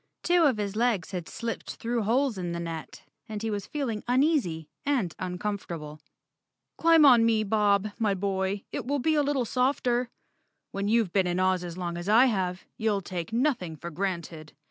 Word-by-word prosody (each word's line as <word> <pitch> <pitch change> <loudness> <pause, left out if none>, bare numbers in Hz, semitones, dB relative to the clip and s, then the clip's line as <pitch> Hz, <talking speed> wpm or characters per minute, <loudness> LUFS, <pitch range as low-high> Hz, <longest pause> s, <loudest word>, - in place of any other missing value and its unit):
Two 350 -1 +4
of 260 -6 +3
his 205 -1 -3
legs 220 -7 +1
had 180 -4 -5
slipped 230 -1 -5
through 235 0 -2
holes 245 +4 +1
in 175 -2 -4
the 170 - -3
net 165 -4 -6 0.3
and 215 0 -5
he 225 - -1
was 205 -2 -4
feeling 250 -8 -3
uneasy 245 - +1 0.2
and 255 - 0
uncomfort¬ 185 0 -3
able. 150 -1 -9 0.4
" - - -58
Climb 330 -2 +6
on 245 -4 +7
me, 225 -1 +3
Bob, 210 -1 +2
my 210 -3 +2
boy. 195 +1 -1
It 255 -4 -4
will 285 +1 +1
be 315 +4 +1
a 300 - +3
little 280 -3 0
softer. 250 -1 +1 0.6
WTien 200 +1 -1
you've 220 -5 +2
been 190 -2 +3
in 175 +1 0
Oz 185 -1 +2
as 175 0 -6
long 175 -1 -3
as 175 +3 -5
I 230 +5 +7
have; 185 -6 -1
you'll 215 -3 0
take 175 -1 -5
nothing 235 - 0
for 170 +3 -8
granted." 170 -3 -4
205 Hz, 190 wpm, -27 LUFS, 180-245 Hz, 0.6 s, on